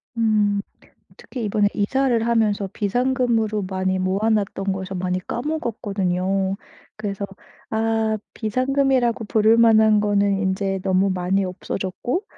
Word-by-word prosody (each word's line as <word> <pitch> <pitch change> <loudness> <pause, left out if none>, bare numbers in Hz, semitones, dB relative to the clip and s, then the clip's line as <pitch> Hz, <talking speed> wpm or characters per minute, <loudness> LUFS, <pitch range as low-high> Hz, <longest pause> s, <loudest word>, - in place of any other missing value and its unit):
음 210 -3 +2 0.6
특히 245 -4 -6
이번에 205 0 +2
이사를 235 +2 +1
하면서 215 -4 +1
비상금으로 230 -1 0
많이 190 0 -1
모아놨던 195 0 0
것을 190 0 -5
많이 180 0 -1
까먹었거든요. 195 - -1 0.4
그래서 200 -2 -4 0.4
아 220 0 0 0.2
비상금이라고 255 0 +1
부를 220 +2 +3
만한 220 -2 +5
거는 200 -1 +2
인제 195 0 -1
너무 190 +1 +2
많이 185 +2 0
없어졌고 190 - -3
210 Hz, 285 characters per minute, -22 LUFS, 195-230 Hz, 0.6 s, 만한